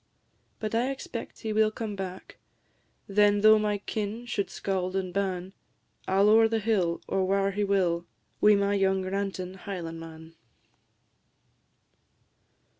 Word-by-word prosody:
But 215 0 -4
I 240 +3 +1
expect 260 -3 -6
he 220 -1 -2
will 215 0 +4
come 215 -1 -5
back; 190 -1 -7 0.7
Then, 205 0 +3
though 215 0 +7
my 210 -1 0
kin 215 +3 -4
should 205 -4 -2
scauld 185 -1 -3
and 185 -2 -2
ban, 190 -1 -2 0.5
I 190 - +1
'll 200 +2 +5
ower 225 +1 +6
the 225 0 0
hill, 200 -6 0
or 190 - 0
whare 195 +1 +1
he 205 +1 -1
will, 180 -4 +1 0.3
Wi' 210 0 +7
my 200 0 +1
young 190 -1 +2
rantin' 190 -1 -3
Highlandman. 165 -3 -7
200 Hz, 135 wpm, -28 LUFS, 185-215 Hz, 0.7 s, though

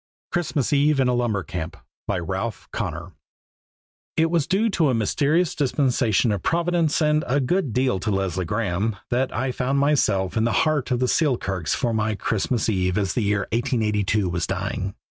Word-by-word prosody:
Christmas 155 -6 -1
Eve 145 0 +3
in 130 - +3
a 125 - +2
Lumber 115 -6 0
Camp 85 -2 -5 0.3
By 100 - 0
Ralph 95 +4 -4
Connor 85 +3 -4 1.1
IT 165 0 +3
was 165 -4 +1
due 200 +5 +2
to 165 -6 +2
a 125 - +2
mysterious 150 - +1
dispensation 125 -5 +1
of 100 -3 -1
Providence 170 - +1
and 150 0 +2
a 135 +4 +2
good 145 +2 0
deal 125 -4 +1
to 100 - -3
Leslie 95 -2 -1
Graeme 105 +2 -1 0.2
that 130 +2 +1
I 130 +3 -1
found 130 +2 -1
myself 110 -10 +2
in 110 - +2
the 115 - +1
heart 150 -4 0
of 125 -1 0
the 125 - +2
Selkirks 100 - 0
for 120 -3 -1
my 110 -1 0
Christmas 110 +3 -1
eve 95 -3 0
as 100 -2 0
the 120 - 0
year 100 -1 +1
1882 110 -5 0
was 85 -6 -2
dying. 95 +1 -3
120 Hz, 180 wpm, -23 LUFS, 100-140 Hz, 1.1 s, Eve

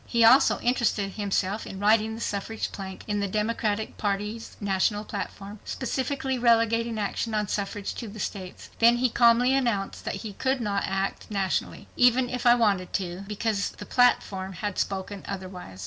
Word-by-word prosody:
He 235 -1 +3
also 250 +4 +6
interested 235 -5 +1
himself 200 0 -1
in 190 - -7
writing 220 +2 +3
the 225 - -8
suffrage 210 +2 -3
plank 190 -2 -7
in 205 -1 -1
the 200 - 0
Democratic 215 +1 -1
Party's 210 +2 -3
national 205 +1 0
platform, 200 0 -6
specifically 265 0 -2
relegating 230 -1 +3
action 215 +2 -2
on 210 -1 0
suffrage 200 +1 -3
to 235 - -6
the 215 +1 -9
states. 185 -2 -6
Then 235 +1 +6
he 250 +1 +2
calmly 240 +2 +5
announced 235 -8 0
that - - -2
he 210 - -5
could 260 +5 0
not 205 -4 -1
act 195 +1 -2
nationally, 195 -3 -2
"even 245 0 +4
if 250 -1 -1
I 240 - +8
wanted 200 -6 +1
to," 185 0 -3
because 210 0 -1
the - - -10
platform 195 -6 +2
had 205 +2 -3
spoken 195 0 -3
otherwise. 185 - -7
210 Hz, 165 wpm, -26 LUFS, 195-235 Hz, -, I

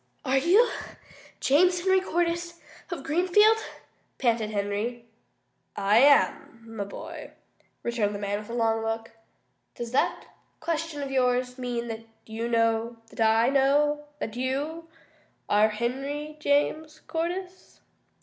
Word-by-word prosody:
"Are 265 0 +3
you 380 - +5 0.7
James 355 +6 +3
Henry 380 +1 +3
Cordyce 340 -1 -1 0.3
of 340 -7 -5
Greenfield?" 370 +9 +4 0.6
panted 230 -4 +1
Henry. 210 +3 -3 0.7
"I 205 +3 +4
am, 275 -4 +3
my 205 -2 -3
boy," 200 - -9 0.5
returned 215 -4 0
the - - -5
man 205 0 -2
with 210 - -11
a 235 - -4
long 225 -1 +1
look. 225 0 -3 0.6
"Does 235 -1 -6
that 255 - 0 0.3
question 320 -2 -3
of 275 - -5
yours 250 -1 +1
mean 240 -1 -3
that 225 0 -7 0.2
you 225 +1 -4
know 230 0 +1
that - - -6
I 225 +2 +4
know 290 +2 +2
that 220 -6 -5
you 285 +6 -3 0.6
are 210 +1 +4
Henry 275 +7 -3
James 305 +2 0
Cordyce?" 360 +3 -5
260 Hz, 125 wpm, -27 LUFS, 225-315 Hz, 0.7 s, you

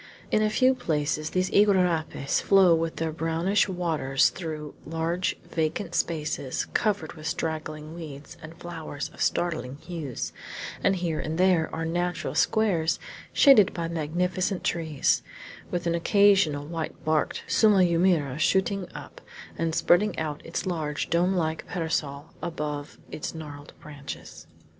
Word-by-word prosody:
In 215 - +3
a 215 - +3
few 255 +4 +4
places 155 - -1
these 185 +1 0
iguarapes 180 -8 +2
flow 190 -3 +6
with 165 0 0
their 160 -1 -2
brownish 165 +6 +1
waters 160 -7 +2
through 155 -4 -6
large 165 +3 -1
vacant 165 +2 -2
spaces 150 -6 -1
covered 200 -7 0
with 155 -2 -7
straggling 155 -1 -3
weeds 155 -3 -9
and 160 +1 -10
flowers 160 -4 -6
of - - -10
startling 150 -7 0
hues, 150 -4 -5 0.5
and 195 - +3
here 170 -4 -2
and 155 +1 -3
there 180 -3 +3
are 165 0 -3
natural 175 +1 -2
squares 180 -7 +2 0.3
shaded 265 -9 +6
by 170 -1 -2
magnificent 175 +4 -1
trees, 160 -5 +1 0.5
with 175 -1 -2
an 170 - +1
occasional 180 -5 +4
white 160 0 -5
barked 155 -1 0
sumaumeira 175 - +3
shooting 190 +2 +1
up, - - -10 0.3
and 165 -1 -1
spreading 185 +1 +3
out 155 -2 -3
its 165 - -4
large 155 -5 -2
dome 175 +3 +3
like 160 -2 -1
parasol 155 -4 -3
above 150 -4 -4
its 155 - -5
gnarled 145 -2 -9
branches. 145 -2 -9
165 Hz, 135 wpm, -26 LUFS, 155-180 Hz, 0.5 s, flow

